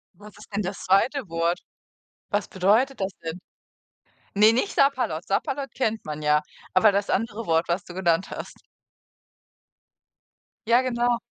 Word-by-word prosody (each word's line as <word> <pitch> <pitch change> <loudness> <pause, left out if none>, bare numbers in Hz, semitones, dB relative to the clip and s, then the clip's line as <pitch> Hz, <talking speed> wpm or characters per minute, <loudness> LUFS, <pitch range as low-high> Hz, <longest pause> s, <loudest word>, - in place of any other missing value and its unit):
Was 210 +2 -14
ist 210 0 -15
denn 205 - +1
das 180 - -5
2. 230 +6 +2
Wort? 165 +1 0 0.7
Was 205 0 -1
bedeutet 215 +9 +2
das 190 0 -1
denn? 165 +2 -5 1.0
Ne, 210 +2 +6
nicht 255 - 0
Sapperlot. 250 - +1
Sapperlot 275 +7 -2
kennt 225 -4 -1
man 150 0 -6
ja, 150 0 +3 0.3
aber 205 +3 +5
das 200 +1 0
andere 225 +1 -1
Wort, 165 0 +2
was 175 +2 0
du 175 - -11
genannt 175 -1 +1
hast. - - -7 2.1
Ja, 235 +2 +5
genau. 240 -1 +1
205 Hz, 145 wpm, -25 LUFS, 175-240 Hz, 2.1 s, Ne